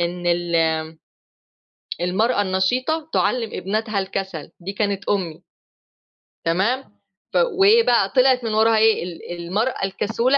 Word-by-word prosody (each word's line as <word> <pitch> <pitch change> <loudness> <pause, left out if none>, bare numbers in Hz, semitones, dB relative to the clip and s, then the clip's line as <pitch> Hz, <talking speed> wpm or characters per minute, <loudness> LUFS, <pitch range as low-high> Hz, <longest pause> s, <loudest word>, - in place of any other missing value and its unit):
إن 175 +1 -2
ال 170 -2 +1 1.2
المرأة 205 +6 +1
النشيطة 250 +12 0
تعلم 235 -3 +1
ابنتها 210 +2 -2
الكسل 190 -5 -5
دي 190 +3 -6
كانت 200 -1 -2
أمي. 180 -6 -2 1.0
تمام 200 +11 +1 0.5
ف - - -9 0.2
وإيه 435 +4 +6
بقى 215 -5 +3
طلعت 255 -1 +4
من 225 -2 -2
وراها 220 +1 +4
إيه 220 -4 +3
ال 175 0 -7
المرأة 210 +3 -1
الكسولة 225 +7 0
200 Hz, 120 wpm, -21 LUFS, 180-235 Hz, 1.2 s, وإيه